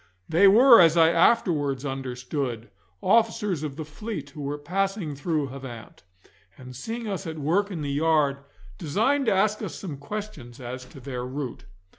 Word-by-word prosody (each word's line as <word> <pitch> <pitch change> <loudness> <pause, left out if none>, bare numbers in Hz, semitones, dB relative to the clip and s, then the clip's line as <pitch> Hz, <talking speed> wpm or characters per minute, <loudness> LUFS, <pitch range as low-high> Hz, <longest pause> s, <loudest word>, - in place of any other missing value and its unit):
They 185 +5 +5
were, 235 +4 +8
as 165 -1 +5
I 165 0 +6
afterwards 155 - +2
understood, 125 -2 -4 0.3
officers 220 - +2
of 150 -3 -5
the 155 0 -6
fleet 155 -2 -7
who 150 - -9
were 145 +1 -3
passing 185 0 -2
through 150 -1 -1
Havant, 130 -4 -10 0.6
and 125 0 -11
seeing 225 - -5
us 195 -3 -4
at 160 -1 -5
work 175 +8 +1
in 170 -6 -5
the 140 - -2
yard, 150 -1 +2 0.4
designed 225 - +1
to - - +4
ask 210 +2 +1
us - - -5
some 160 -8 -6
question 145 - -7
as 125 +1 -7
to 135 - -13
their 125 -1 -5
route. 130 0 -6
155 Hz, 165 wpm, -25 LUFS, 135-195 Hz, 0.6 s, were